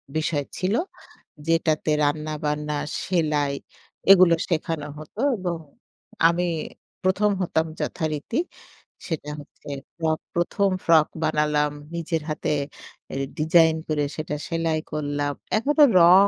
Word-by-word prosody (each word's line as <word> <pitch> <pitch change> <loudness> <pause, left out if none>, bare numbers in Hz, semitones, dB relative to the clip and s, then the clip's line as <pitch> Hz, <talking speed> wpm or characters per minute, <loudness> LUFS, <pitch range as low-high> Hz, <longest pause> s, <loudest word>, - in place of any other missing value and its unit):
বিষয় 155 -2 0
ছিল 185 +3 0 0.7
যেটাতে 160 -2 +2
রান্নাবান্না, 150 0 -1 0.3
সেলাই 150 -5 +1 0.6
এগুলো 185 -3 +8 0.2
শেখানো 165 -3 -1
হত 155 0 -11 0.2
এবং 180 -3 -2 0.7
আমি 170 +1 +1 0.6
১ম, 190 +3 +3
হতাম 160 -3 +1
যথারীতি 155 - -2 0.7
সেটা 155 -4 -3
হচ্ছে 145 - -15 0.3
ফ্রক 160 -2 0 0.2
১ম, 185 +3 +2 0.2
ফ্রক 160 -2 +6 0.2
বানালাম 150 -1 +2 0.2
নিজের 165 -1 -1
হাতে 150 - -2 0.6
অ্যা - - -6 0.2
ডিজাইন 160 +1 +5
করে 150 -2 0
সেটা 155 -1 -3
সেলাই 165 -1 0
করলাম। 145 -1 -1 0.2
এখনো 295 +6 +4 0.2
রং, 185 +4 +8
160 Hz, 105 wpm, -24 LUFS, 150-170 Hz, 0.7 s, এগুলো